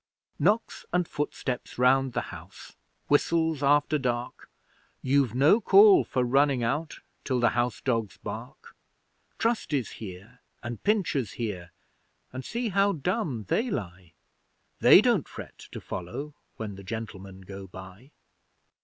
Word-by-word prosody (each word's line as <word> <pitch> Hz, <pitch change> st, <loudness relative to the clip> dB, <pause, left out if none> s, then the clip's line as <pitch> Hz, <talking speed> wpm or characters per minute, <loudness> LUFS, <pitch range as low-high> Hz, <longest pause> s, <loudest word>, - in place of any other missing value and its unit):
Knocks 210 Hz, +9 st, +1 dB
and 180 Hz, -1 st, +1 dB
footsteps 135 Hz, -4 st, -4 dB
round 130 Hz, +1 st, +3 dB
the 120 Hz, -, -3 dB
house -, -, -12 dB, 0.3 s
whistles 160 Hz, +1 st, +2 dB
after 145 Hz, +2 st, +3 dB
dark 125 Hz, -2 st, -3 dB, 0.5 s
You've 130 Hz, -3 st, +2 dB
no 150 Hz, -, +5 dB
call 400 Hz, -, +7 dB
for 130 Hz, -, -1 dB
running 135 Hz, 0 st, +2 dB
out 150 Hz, +7 st, -2 dB, 0.2 s
till 130 Hz, -2 st, 0 dB
the 120 Hz, -, +4 dB
house 120 Hz, -2 st, -1 dB
dogs 115 Hz, -5 st, -1 dB
bark. -, -, -9 dB, 0.6 s
Trusty's 190 Hz, -, -1 dB
here, 100 Hz, +5 st, -10 dB, 0.2 s
and 120 Hz, -1 st, -6 dB
Pincher's 175 Hz, -, 0 dB
here, 95 Hz, -7 st, -5 dB, 0.6 s
and 130 Hz, 0 st, -5 dB
see 235 Hz, -, -3 dB
how 200 Hz, +1 st, +2 dB
dumb 160 Hz, -, -2 dB
they 245 Hz, +3 st, 0 dB
lie 90 Hz, -, -6 dB, 0.7 s
They -, -, +8 dB
don't -, -, +2 dB
fret -, -, -10 dB
to -, -, -6 dB
follow 125 Hz, +12 st, -6 dB, 0.2 s
when 105 Hz, -3 st, -6 dB
the 100 Hz, -, -10 dB
Gentlemen 100 Hz, -3 st, -7 dB
go 95 Hz, +1 st, -9 dB
by! 95 Hz, +7 st, -12 dB
130 Hz, 130 wpm, -27 LUFS, 110-150 Hz, 0.7 s, They